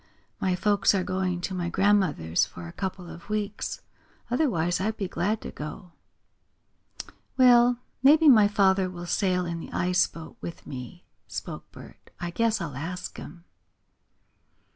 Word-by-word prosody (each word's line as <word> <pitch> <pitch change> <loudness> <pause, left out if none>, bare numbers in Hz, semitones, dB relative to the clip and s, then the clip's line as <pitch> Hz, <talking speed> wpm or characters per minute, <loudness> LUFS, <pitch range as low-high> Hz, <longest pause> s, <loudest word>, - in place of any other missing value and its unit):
My 185 -1 +1
folks 200 +1 +3
are 190 - +1
going 185 -1 -1
to 190 - -3
my 175 -2 -2
grandmother's 185 - +2
for 85 -1 -6
a - - -8
couple 190 -2 -5
of 170 +3 -11
weeks. 210 -1 -3 0.5
Otherwise 185 - +1
I'd 215 +3 -1
be 195 - -2
glad 200 +5 -1
to - - -7
go." 150 +4 -8 1.5
"Well, 245 -1 +6 0.2
maybe 305 +4 +6
my 220 -7 +8
father 190 -2 +3
will 175 -1 -7
sail 180 0 +1
in 170 -1 -4
the - - -9
ice 180 +1 +2
boat 165 -1 -11
with 170 - -8
me," 130 +6 -8 0.2
spoke - - -7
Bert. - - -14
"I 175 -1 -4
guess 225 +3 +1
I'll 160 -7 -5
ask 175 +6 -5
him." 175 -1 -10
185 Hz, 150 wpm, -27 LUFS, 170-210 Hz, 1.5 s, my